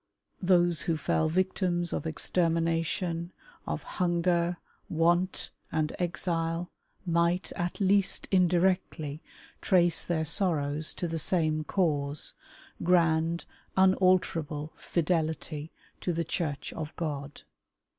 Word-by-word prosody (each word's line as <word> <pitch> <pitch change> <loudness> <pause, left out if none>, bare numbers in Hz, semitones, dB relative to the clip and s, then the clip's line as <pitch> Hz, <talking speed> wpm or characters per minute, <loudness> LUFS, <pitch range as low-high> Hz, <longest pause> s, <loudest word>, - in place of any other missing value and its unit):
Those 175 -3 +4
who 165 -2 0
fell 155 +1 +1
victims 175 0 0
of - - -2
extermination, 165 +1 0 0.4
of - - -3
hunger, 175 0 0 0.3
want, 175 +3 +1 0.2
and 155 -1 -1
exile, 170 -1 -2 0.3
might, 170 +1 +1
at 175 +3 -3
least 195 0 +2
indirectly, 175 -4 +1 0.4
trace 175 -4 +3
their 160 -2 -1
sorrows 155 -3 +1
to 175 - -2
the 165 0 -2
same 155 -2 +2
cause 150 -5 0 0.2
— - - -21
grand, 165 -1 +2 0.3
unalterable 185 -5 +2
fidelity 160 -2 -2 0.3
to 180 - -1
the 165 0 -1
Church 145 -3 -3
of 155 -1 -6
God. 145 -4 -5
170 Hz, 105 wpm, -29 LUFS, 160-180 Hz, 0.4 s, Those